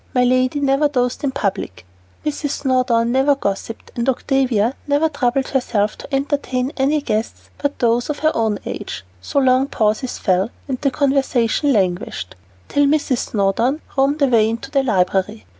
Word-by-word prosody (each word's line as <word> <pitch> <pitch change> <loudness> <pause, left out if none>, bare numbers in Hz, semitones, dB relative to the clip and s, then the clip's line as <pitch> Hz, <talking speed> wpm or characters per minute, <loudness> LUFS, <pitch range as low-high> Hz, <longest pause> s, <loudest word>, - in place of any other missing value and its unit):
My 250 - +4
lady 255 +3 +2
never 280 +1 +3
dozed 250 -3 -1
in 280 - +1
public, 200 - -3 0.4
Mrs. 290 -1 -3
Snowdon 250 -3 +2
never 270 +3 +3
gossiped, 210 -2 -4
and 235 +2 0
Octavia 255 -3 +1
never 290 +3 +2
troubled 265 -2 0
herself 220 -6 0
to - - -10
entertain 275 -1 -1
any 290 +3 +1
guests 220 -3 -3
but 285 0 -2
those 240 +2 +1
of 295 - -2
her 310 - +5
own 220 -2 +1
age, - - -6 0.2
so 95 - -4
long 260 0 +4
pauses 220 +2 0
fell, 190 +2 +1 0.2
and 260 -3 -3
conversation 275 -1 +1
languished, 180 - -1 0.3
till 285 0 +2
Mrs. 285 -4 +1
Snowdon 225 +8 +1 0.2
roamed 280 +2 +2
away 230 -5 +4
into 230 +4 -5
the 275 - +3
library. 185 - 0
255 Hz, 155 wpm, -19 LUFS, 225-280 Hz, 0.4 s, her